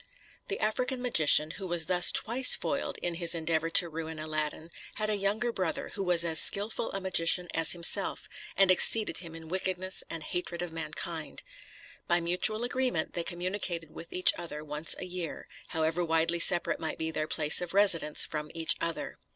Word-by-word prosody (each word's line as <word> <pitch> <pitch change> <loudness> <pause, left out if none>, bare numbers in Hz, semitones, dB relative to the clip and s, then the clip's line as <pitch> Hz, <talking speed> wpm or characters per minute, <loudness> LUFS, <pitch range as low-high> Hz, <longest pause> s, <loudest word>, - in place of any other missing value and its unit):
The 405 - -4
African 250 +4 -2
magician, 160 -10 +3
who 190 +1 -8
was 170 -2 -1
thus 180 +1 +5
twice 250 +3 +4
foiled - - -4
in 175 - -2
his 170 0 0
endeavor 165 0 -1
to 170 +1 +5
ruin 160 0 -7
Aladdin, 155 +1 -4 0.2
had 215 0 -2
a - - 0
younger 205 +4 -1
brother, 185 -7 -3
who 195 - -5
was 175 -2 +2
as 160 -2 +5
skilful 205 +9 +4
a 195 - -3
magician 180 -1 +1
as 165 -1 +4
himself, 170 -1 +1 0.3
and 195 -1 +5
exceeded 215 +4 +4
him 165 -2 -8
in 165 -1 -11
wickedness 185 +1 -3
and 165 -2 -6
hatred 175 0 -5
of 175 - -6
mankind. 160 0 -6 0.6
By 175 0 +2
mutual 180 +6 +2
agreement 245 -8 -2
they 170 - -3
communicated 175 -2 -5
with 170 - -12
each 185 - +5
other 150 -3 -7
once 150 +1 -2
a - - -7
year, 180 -3 -6 0.2
however 160 +2 -2
widely 165 +1 0
separate 175 +1 +3
might 160 -1 -5
be 160 0 -4
their 155 -1 -3
place 150 0 +3
of 180 +1 -4
residence 170 -7 +2
from 150 -1 -6
each 165 -1 +1
other. 165 -1 -4
170 Hz, 180 wpm, -29 LUFS, 160-190 Hz, 0.6 s, thus